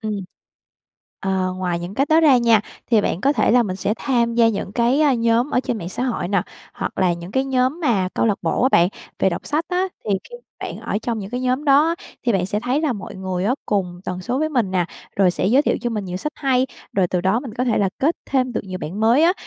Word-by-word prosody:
Ừ. 215 Hz, -2 st, -3 dB, 1.1 s
Ờ, 190 Hz, -1 st, 0 dB
ngoài 180 Hz, -2 st, -1 dB
những 175 Hz, +3 st, -6 dB
cách 275 Hz, +4 st, +1 dB
đó 320 Hz, +1 st, +5 dB
ra 290 Hz, -5 st, +6 dB
nha, 230 Hz, -3 st, +4 dB, 0.3 s
thì 225 Hz, -, +5 dB
bạn 185 Hz, -2 st, -1 dB
có 280 Hz, +4 st, +3 dB
thể -, -, +2 dB
là 245 Hz, +1 st, +5 dB
mình 185 Hz, -4 st, -3 dB
sẽ 200 Hz, +2 st, -1 dB
tham 235 Hz, -4 st, 0 dB
gia 230 Hz, -1 st, +5 dB
những 200 Hz, -2 st, -3 dB
cái, 245 Hz, +5 st, +2 dB
a, 290 Hz, -4 st, +4 dB
nhóm 235 Hz, +3 st, +2 dB
ở 250 Hz, -, +2 dB
trên 240 Hz, -4 st, -3 dB
mạng 170 Hz, -, -5 dB
xã 215 Hz, -, -4 dB
hội 225 Hz, -8 st, -2 dB
nè, 195 Hz, -3 st, +2 dB, 0.3 s
hoặc -, -, -4 dB
là 180 Hz, -2 st, +3 dB
những 170 Hz, +2 st, -7 dB
cái 265 Hz, 0 st, +1 dB
nhóm 260 Hz, +4 st, 0 dB
mà 205 Hz, -, +1 dB
câu -, -, +2 dB
lạc 210 Hz, -3 st, +1 dB
bộ 165 Hz, +7 st, 0 dB
á 260 Hz, -, +5 dB
bạn 175 Hz, -8 st, +4 dB, 0.3 s
về 190 Hz, -, +3 dB
đọc -, -, -5 dB
sách 310 Hz, +2 st, 0 dB
á, 365 Hz, +1 st, 0 dB, 0.2 s
thì 210 Hz, -, -3 dB, 0.2 s
khi -, -, -10 dB, 0.3 s
bạn -, -, -5 dB
ở 205 Hz, -, -2 dB
trong 230 Hz, -2 st, -2 dB
những 200 Hz, +1 st, -6 dB
cái 250 Hz, +1 st, -3 dB
nhóm 255 Hz, +3 st, 0 dB
đó 285 Hz, +2 st, +5 dB
á, 335 Hz, -, +1 dB, 0.3 s
thì 235 Hz, -, +4 dB
bạn 185 Hz, -2 st, +1 dB
sẽ 205 Hz, +2 st, -1 dB
thấy 250 Hz, +5 st, 0 dB
là 300 Hz, -5 st, +1 dB
mọi 200 Hz, -4 st, -7 dB
người 185 Hz, -1 st, -3 dB
á 245 Hz, +5 st, +2 dB
cùng 180 Hz, -4 st, -1 dB
tần 180 Hz, 0 st, -4 dB
số 245 Hz, +8 st, -2 dB
với 310 Hz, +1 st, +1 dB
mình 240 Hz, -10 st, 0 dB
nè, 180 Hz, -2 st, +1 dB, 0.3 s
rồi 190 Hz, -2 st, +4 dB
sẽ 180 Hz, -, -1 dB
giới 260 Hz, +7 st, +4 dB
thiệu -, -, +1 dB
cho 240 Hz, -, -2 dB
mình 210 Hz, -3 st, -3 dB
nhiều 180 Hz, 0 st, -4 dB
sách 300 Hz, +10 st, -4 dB
hay, 265 Hz, -2 st, +2 dB, 0.3 s
rồi 190 Hz, -2 st, +2 dB
từ 180 Hz, 0 st, -1 dB
đó 195 Hz, +6 st, +1 dB
mình 240 Hz, -6 st, -8 dB
có 250 Hz, 0 st, -1 dB
thể 235 Hz, -, +1 dB
là 200 Hz, -, +2 dB
kết 310 Hz, +5 st, +1 dB
thêm 255 Hz, -2 st, 0 dB
được -, -, -1 dB
nhiều 185 Hz, -1 st, -6 dB
bạn 180 Hz, +7 st, -5 dB
mới 235 Hz, +7 st, +4 dB
á. 345 Hz, +2 st, +5 dB
230 Hz, 275 wpm, -21 LUFS, 190-260 Hz, 1.1 s, ra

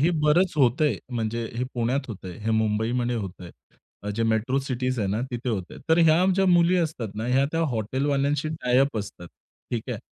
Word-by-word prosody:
हे 160 Hz, +5 st, +4 dB
बरंच 170 Hz, +5 st, +3 dB
होत 130 Hz, 0 st, +3 dB
आहे 150 Hz, -, +2 dB, 0.2 s
म्हणजे 115 Hz, 0 st, -2 dB
हे 125 Hz, -, -1 dB
पुण्यात 120 Hz, +3 st, 0 dB
होत 105 Hz, -5 st, -8 dB
आहे, 90 Hz, -, -6 dB
हे 110 Hz, +1 st, -2 dB
मुंबईमध्ये 110 Hz, +3 st, 0 dB
होत 100 Hz, -4 st, -6 dB
आहे, 95 Hz, +3 st, -12 dB
जे 115 Hz, -, -1 dB
मेट्रो 115 Hz, +4 st, +1 dB
सिटीज 130 Hz, -1 st, -2 dB
आहे 105 Hz, -, 0 dB
ना 105 Hz, +4 st, -1 dB
तिथे 125 Hz, +1 st, -4 dB
होत 105 Hz, -5 st, -1 dB
आहे. -, -, -10 dB
तर 160 Hz, +1 st, +4 dB
ह्या 165 Hz, +1 st, +5 dB
ज्या 195 Hz, 0 st, +2 dB
मुली 175 Hz, 0 st, +4 dB
असतात 155 Hz, -10 st, -1 dB
ना 110 Hz, +2 st, -4 dB
या 130 Hz, +2 st, +3 dB
त्या 165 Hz, -, 0 dB
हॉटेलवाल्यांशी 140 Hz, +6 st, 0 dB
टाय-अप 135 Hz, -4 st, +1 dB
असतात 100 Hz, -3 st, -7 dB, 0.4 s
ठीक 120 Hz, -3 st, -2 dB
आहे. 115 Hz, -, -3 dB
125 Hz, 200 wpm, -25 LUFS, 110-145 Hz, 0.4 s, ह्या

